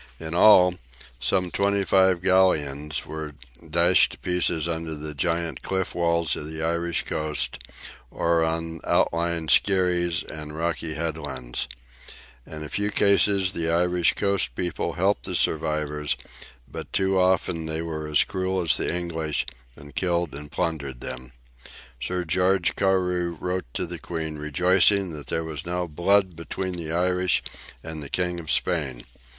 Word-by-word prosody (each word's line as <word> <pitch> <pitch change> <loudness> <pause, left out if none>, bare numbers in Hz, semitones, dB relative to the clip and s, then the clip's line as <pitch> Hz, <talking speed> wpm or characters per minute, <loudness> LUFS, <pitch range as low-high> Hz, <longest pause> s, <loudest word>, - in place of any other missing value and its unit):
In 80 0 -6
all, 90 -1 +7 0.5
some 90 +8 +1
twenty 100 0 +1
five 95 -2 +3
galleons 75 -6 +2
were 80 -2 -6 0.3
dashed 85 +3 +4
to - - -11
pieces 85 -3 0
under 80 -1 -3
the 75 0 -6
giant 85 -1 -1
cliff 95 -1 -2
walls 85 -2 +1
of 75 - -6
the 80 0 -5
Irish 85 +1 0
coast, 75 -1 -1 0.5
or 85 +3 +1
on 80 0 -2
outlying 85 -1 +1
skerries 90 -2 +3
and 75 0 -8
rocky 80 -1 -2
headlands. 75 -7 -3 0.8
In 75 -1 -7
a 75 - -7
few 105 +5 -1
cases 100 -2 +3
the 85 -1 -1
Irish 90 +1 +2
coast 100 -8 +1 0.3
folk - - -2
helped - - +1
the - - -3
survivors, 75 -2 0 0.5
but - - -8
too 95 0 +2
often 90 -3 +1
they 80 +1 -2
were 80 -2 -4
as 75 -1 +4
cruel 95 0 -2
as 80 -6 +3
the - - 0
English, 80 -3 -2 0.3
and 75 0 -13
killed 85 -2 0
and 75 +1 -8
plundered 70 -5 -3
them. 65 0 -7 0.7
Sir 90 -1 -2
George 90 +2 +2
Carew 90 -3 +1
wrote 90 +1 -2
to - - -1
the 85 -1 -7
Queen, 80 -3 -4
rejoicing 90 +5 +3
that 75 -4 -8
there 80 - -1
was 80 -1 -5
now 90 0 -2
"blood 90 +3 +2
between 90 +3 -4
the 85 -3 -5
Irish 90 +1 +2 0.4
and 80 -1 -6
the 70 - -7
King 90 -1 -1
of 80 - -8
Spain." 70 -9 0
85 Hz, 150 wpm, -25 LUFS, 75-90 Hz, 0.8 s, all